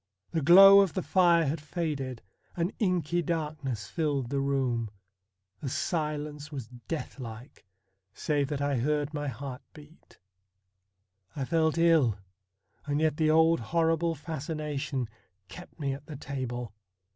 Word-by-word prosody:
The 165 - 0
glow 195 +6 +9
of 195 -3 +2
the 185 - -1
fire 175 -3 +4
had 145 +2 -2
faded, 145 -6 -4 0.3
an 170 +2 -1
inky 175 -4 +1
darkness 150 -9 -3
filled 145 -6 -1
the 140 - 0
room, 130 -5 0 0.7
the 135 - -4
silence 150 -1 -3
was 130 -6 -6 0.2
death 160 -3 -5
like, 115 -2 -10 0.4
save 145 +5 -1
that 145 -1 -3
I 140 -1 +1
heard 145 +4 0
my 145 -1 -3
heart 130 0 -6
beat. 150 +1 -17 1.2
I 140 -3 -2
felt 160 +1 +1
ill, 160 -10 +4 0.7
and 145 0 0
yet 155 -1 +1
the 155 -1 +2
old 160 +1 +4
horrible 165 +6 +1
fascination 150 -4 -4 0.4
kept 180 -1 -12
me 140 -2 -1
at 140 +2 -10
the 155 - -7
table. 125 -5 -5
150 Hz, 135 wpm, -29 LUFS, 135-165 Hz, 1.2 s, glow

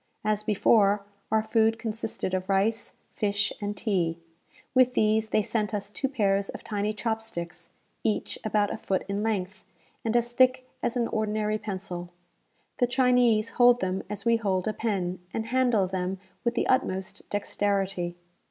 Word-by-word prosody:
As 215 -1 +1
before, 205 -1 +3 0.3
our 220 0 +3
food 225 0 +2
consisted 220 -4 -3
of 185 +1 -2
rice, 200 +4 +1 0.2
fish, 205 -1 0
and 205 0 -3
tea. 180 -6 0 0.6
With 255 -1 +4
these 215 0 +2
they 215 - +2
sent 210 0 -1
us 205 0 -4
two 270 +5 -2
pairs 200 -6 +1
of - - -7
tiny 210 -1 -1
chop 220 +1 -2
sticks, 170 -5 -7 0.3
each 215 - -1
about 210 -1 +1
a - - -4
foot 190 - -1
in 200 +1 -2
length, 205 -3 -2 0.4
and 225 0 -1
as 240 0 0
thick 255 +1 +3
as 240 - -1
an 235 -1 +1
ordinary 215 0 0
pencil. 185 -4 -5 0.7
The 245 - +3
Chinese 245 -3 +3
hold 245 0 +5
them 185 0 -1
as 205 0 -5
we 230 0 +4
hold 190 -4 0
a 215 - 0
pen, 190 -6 -2 0.2
and 225 - -1
handle 245 -4 +2
them 185 0 -2 0.3
with 235 0 0
the - - +1
utmost 195 -5 -1
dexterity. 195 -3 -1
210 Hz, 160 wpm, -27 LUFS, 195-225 Hz, 0.7 s, hold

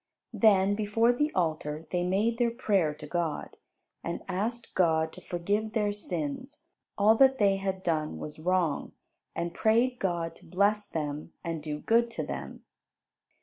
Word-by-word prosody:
Then 200 -2 +4
before 220 +3 +2
the 295 +5 0
altar 155 -3 -1
they 175 -1 0
made 210 +6 +1
their 240 -1 +3
prayer 205 -9 +1
to 150 - -9
God, 170 -4 -3 0.5
and 170 - -4
asked 225 +5 -3
God 160 -3 +2
to - - -11
forgive 205 +5 -2
their 210 -2 +1
sins, 205 - -5 0.3
all 210 +1 +6
that 265 +1 +6
they 200 -3 +3
had 190 -1 -3
done 155 -3 -1
was 150 0 -7
wrong; 175 -3 0 0.4
and 170 0 -2
prayed 240 +3 +2
God 170 -3 -1
to - - -18
bless 205 +3 +1
them 150 0 -4
and 165 -2 -3
do 150 -1 -4
good 235 +5 +3
to - - -1
them. - - -6
190 Hz, 155 wpm, -29 LUFS, 165-220 Hz, 0.5 s, all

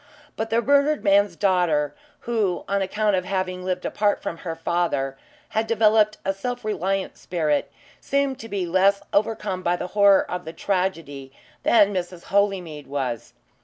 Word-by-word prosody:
But 220 0 -3
the 230 +1 +1
murdered 285 +2 +3
man's 200 -2 +3
daughter, 170 -7 +1 0.3
who, 215 -6 -1
on 200 0 0
account 210 +1 +1
of 185 - 0
having 185 -1 -3
lived 180 0 -2
apart 205 -1 +1
from 165 - -5
her 165 -1 -5
father, 165 -5 -1 0.3
had 220 +1 -1
developed 215 -1 +3
a 195 - +1
self 245 +4 -5
reliant 195 -1 -2
spirit, 155 -5 -1 0.3
seemed 280 -1 -1
to 225 - -9
be 195 -3 -2
less 195 +3 +3
overcome 205 -3 0
by 175 0 +1
the 180 - -5
horror 200 -1 +6
of 180 0 -5
the 160 - -8
tragedy 165 -10 -2 0.3
than 205 - +4
Mrs. 180 -1 -4
Holymead 185 -7 0
was. 130 -4 -4
190 Hz, 160 wpm, -23 LUFS, 175-210 Hz, 0.3 s, horror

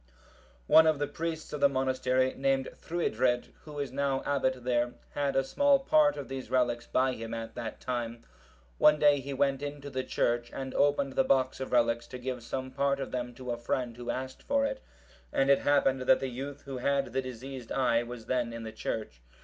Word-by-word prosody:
One 160 - +7
of 155 -2 +3
the 145 - 0
priests 160 +1 -5
of 150 - -4
the 140 - +6
monastery, 130 -1 +1
named 135 -1 +1
Thruidred, 125 -7 -1
who 150 -1 -9
is 140 -3 -3
now 135 0 0
abbot 130 -3 0
there, 120 -1 +1 0.2
had 140 -1 -1
a 135 - +3
small 285 - +4
part 290 +2 +3
of - - -5
these 135 -1 -6
relics 120 -2 +1
by 130 0 +2
him 115 0 -5
at 115 0 -6
that 110 -2 -6
time. 120 -2 -4 0.6
One 150 0 +6
day 145 -1 +5
he 140 +1 -6
went 135 0 +1
into 145 -1 -6
the 130 -1 -2
church 120 -1 0
and 135 -1 -5
opened 140 -1 +2
the 135 - +3
box 130 0 +2
of 130 - -5
relics, 120 -1 +2
to 125 - -7
give 125 -1 -4
some 130 +2 -4
part 140 +1 +1
of 135 - -4
them 125 -1 -4
to 125 0 -5
a 120 - -2
friend 120 0 -2
who 120 0 -7
asked 130 +1 -4
for 280 0 +1
it, - - -3 0.5
and 135 +1 +3
it 140 - +5
happened 140 -2 +2
that 130 +1 +4
the 135 - -3
youth 135 +3 -6
who 135 -2 -6
had 135 -2 0
the 135 - +1
diseased 130 -1 -8
eye 120 -3 +2
was 120 -1 -8
then 120 -2 -1
in 115 0 -6
the 110 - -6
church. 110 - -5
130 Hz, 210 wpm, -30 LUFS, 120-140 Hz, 0.6 s, One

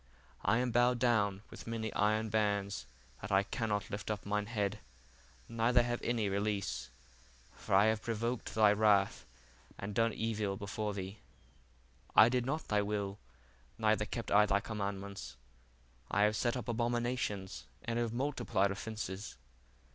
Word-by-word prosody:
I 115 - +3
am 125 0 +1
bowed 120 +1 +4
down 105 -5 +2
with - - -10
many 110 -1 -3
iron 110 +1 +2
bands, 100 - 0 0.3
that 95 - -6
I 95 0 +4
cannot 105 -1 -2
life 100 +1 -4
up 105 -2 -3
mine 105 0 -1
head, 105 -2 -1 0.7
neither 115 +1 +3
have 120 0 -2
any 115 -3 0
release: 100 - -1 0.7
for - - -1
I 100 +2 +7
have 110 0 +2
provoked 115 +1 -2
thy 105 -2 +6
wrath, 105 -2 +3 0.5
and 100 +1 -5
done 115 +2 +2
evil 110 -3 -2
before 105 +1 -3
thee: 95 +2 -6 1.0
I 110 - +9
did 125 0 0
not 155 +4 -2
thy 105 -1 +2
will, 100 -1 -2 0.6
neither 110 -2 +2
kept 115 +1 -5
I 105 +1 +6
thy 100 0 +3
commandments: 100 - -5 0.7
I 105 - +3
have 105 +1 +3
set 120 +3 0
up 125 - -6
abominations, 120 -4 -1 0.2
and 115 0 -1
have 120 -2 0
multiplied 120 -6 0
offences. 100 - -5
105 Hz, 145 wpm, -34 LUFS, 100-115 Hz, 1.0 s, I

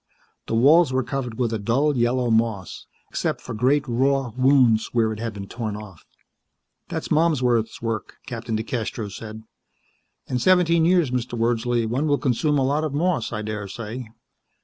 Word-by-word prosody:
The - - -1
walls 150 +6 +5
were 130 0 +1
covered 125 -3 -4
with 120 -3 0
a 110 - -1
dull 135 +8 +1
yellow 120 0 +1
moss, 110 -5 -1 0.2
except - - -1
for - - -7
great, 130 +6 +2
raw 130 +1 +1
wounds 130 -4 +3
where 110 -2 +2
it 110 - -8
had 115 0 -3
been 100 -2 -7
torn 110 -2 -4
off. 100 -5 -12 0.8
"That's - - -4
Malmsworth's 125 -9 +1
work," 115 -2 -3
Captain 115 -3 -4
DeCastros 110 -2 -4
said. 110 0 -8 0.8
"In 125 - -2
seventeen 170 -1 +4
years, 175 -6 +3
Mr. 125 -1 -2
Wordsley, 120 0 +1
one 130 +7 -1
will 145 -1 +3
consume 145 +3 +1
a 135 - +2
lot 145 +3 +1
of 150 -3 -2
moss, 165 -5 0
I 110 -2 -3
daresay. 110 +3 -5
120 Hz, 165 wpm, -23 LUFS, 110-140 Hz, 0.8 s, walls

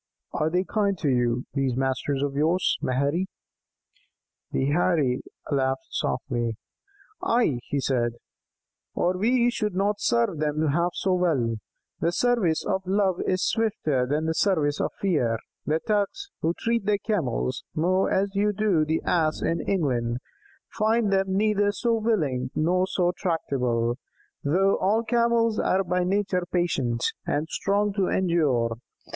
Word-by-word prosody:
'" - - -59
"Are 155 - +2
they 180 +3 +1
kind 200 -1 0
to 150 - 0
you, 120 -1 +1
these 135 -3 0
masters 135 +1 -1
of 140 -1 -1
yours, 160 +6 +2
Maherry?" 140 +8 0 1.2
The 135 +2 0
Heirie 150 -6 +2 0.3
laughed 135 -1 0
softly. 120 -3 -2 0.6
"Ay," 230 - +2
he 145 - -1
said, 120 -3 0 0.8
"or 180 +1 +1
we 240 +5 +2
should 210 -5 -2
not 205 +2 0
serve 230 -9 +1
them 155 0 0
half 170 +4 0
so 190 - 0
well. 145 -11 +1 0.4
The 170 - +1
service 205 -6 +1
of 190 - 0
love 190 -2 +1
is 185 0 +1
swifter 155 - 0
than 150 +4 0
the 160 - 0
service 160 -6 +1
of - - -1
fear; 135 -12 +1 0.3
the 155 +1 +2
Turks, 215 - -1
who 165 +2 0
treat 230 -3 -1
their 210 -1 +3
Camels 150 - -2
more 185 +4 +2
as 195 +1 0
you 205 +1 +1
do 200 -6 +2
the 160 +1 -1
Ass 155 -3 +1
in 165 0 0
England, 125 -10 0 0.5
find 220 -1 +1
them 190 0 +1
neither 205 -1 +2
so 230 +4 0
willing 160 - 0
nor 180 +4 +2
so 180 -2 +1
tractable, 125 - -1 0.4
though 190 +7 +2
all 215 +4 +1
Camels 235 -1 +2
are 190 +1 +2
by 180 0 0
nature 185 -1 0
patient, 135 -10 0 0.2
and 150 +2 0
strong 205 +1 0
to 195 -2 +1
endure. 150 -11 +1
175 Hz, 145 wpm, -25 LUFS, 140-200 Hz, 1.2 s, their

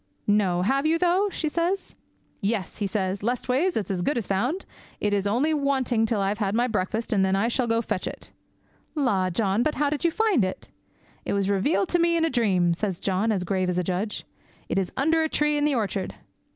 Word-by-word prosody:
"No, 195 -4 +2
have 275 +8 +1
you, 325 +1 +3
though?" 360 +4 +2
says 340 +3 -1 0.5
she. 195 - 0
"Yes," 210 -3 -3
says 190 -1 -1
he; - - -15
"leastways, 255 - 0
it 215 - -1
is - - -5
as 185 -2 -1
good 255 +9 0
as 230 - -1
found; 245 - -1 0.3
it 205 -1 0
is 200 0 +1
only 260 +10 +2
waiting 265 -6 +1
till 220 -2 0
I've 200 +2 -1
had 200 -1 0
my 240 +2 +3
breakfast, 220 +1 -1
and 195 -2 +3
then 190 0 +2
I'll 225 +5 +1
go 255 - +1
out - - -5
and 230 0 0
fetch 185 - -2
it - - -8 0.6
in!" 290 -3 +1
"La, 190 -6 +2
John, 195 +3 +1
but 300 +5 0
how 290 -1 +1
did 300 - -2
you 340 - +4
find 415 - +2
it!" 185 0 -4 0.5
"It - - -2
was 200 0 +1
revealed 290 - +1
to 350 - +2
me 340 0 +3
in 325 - +2
a 325 - -1
dream," 190 -8 +2
says 185 0 -3
John, 195 +3 0
as 195 -4 0
grave 185 0 0
as 180 - -1
a 180 - +1
judge; 190 +4 -2 0.4
"it - - +1
is 185 -2 -2
under 320 +4 +3
a 315 - 0
tree 300 0 +1
in 290 0 +1
the 295 -2 +2
orchard." 200 -4 -2
225 Hz, 235 wpm, -25 LUFS, 195-295 Hz, 0.6 s, you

